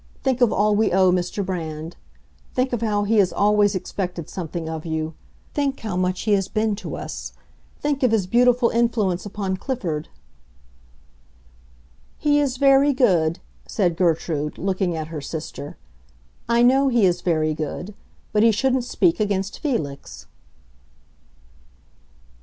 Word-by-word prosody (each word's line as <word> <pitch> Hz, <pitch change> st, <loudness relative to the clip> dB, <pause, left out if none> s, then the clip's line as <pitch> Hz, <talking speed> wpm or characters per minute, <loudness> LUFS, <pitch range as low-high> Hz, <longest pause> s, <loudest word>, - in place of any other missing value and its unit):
Think 260 Hz, -2 st, 0 dB
of 245 Hz, -, +5 dB
all 210 Hz, +1 st, +2 dB
we 220 Hz, +2 st, +2 dB
owe 185 Hz, 0 st, +4 dB
Mr. 180 Hz, +2 st, -1 dB
Brand. 165 Hz, -3 st, -5 dB, 0.6 s
Think 255 Hz, 0 st, 0 dB
of 235 Hz, -, -1 dB
how 210 Hz, -2 st, +1 dB
he 220 Hz, +2 st, +1 dB
has 195 Hz, -3 st, +4 dB
always 205 Hz, 0 st, +3 dB
expected 180 Hz, -3 st, -4 dB
something 170 Hz, -2 st, -5 dB
of 160 Hz, -1 st, -5 dB
you. 160 Hz, -1 st, -3 dB, 0.4 s
Think 280 Hz, -2 st, -1 dB
how 215 Hz, -5 st, -3 dB
much 185 Hz, 0 st, 0 dB
he 215 Hz, -, -1 dB
has 195 Hz, -2 st, +2 dB
been 215 Hz, -1 st, 0 dB
to -, -, -6 dB
us. -, -, -6 dB, 0.5 s
Think 290 Hz, -1 st, -1 dB
of 255 Hz, -, +4 dB
his 215 Hz, -4 st, +2 dB
beautiful 245 Hz, +3 st, +3 dB
influence 215 Hz, -6 st, 0 dB
upon 195 Hz, -2 st, -3 dB
Clifford." 180 Hz, -, -3 dB, 2.1 s
"He 295 Hz, -1 st, +2 dB
is 270 Hz, -3 st, 0 dB
very 275 Hz, +1 st, +5 dB
good," 180 Hz, -, +2 dB, 0.3 s
said 180 Hz, -5 st, 0 dB
Gertrude, 160 Hz, -3 st, 0 dB
looking 185 Hz, -2 st, -1 dB
at 155 Hz, 0 st, -5 dB
her 155 Hz, -3 st, -5 dB
sister. 150 Hz, -1 st, -7 dB, 0.7 s
"I 235 Hz, 0 st, +4 dB
know 265 Hz, +3 st, +5 dB
he 235 Hz, -6 st, +3 dB
is 175 Hz, -1 st, +1 dB
very 155 Hz, -3 st, +1 dB
good. 155 Hz, +6 st, -5 dB, 0.4 s
But 210 Hz, -, +3 dB
he 225 Hz, +1 st, +6 dB
shouldn't 255 Hz, +3 st, +1 dB
speak 330 Hz, +5 st, +1 dB
against 200 Hz, -2 st, -1 dB
Felix." 155 Hz, -, -4 dB
200 Hz, 145 wpm, -22 LUFS, 175-240 Hz, 2.1 s, he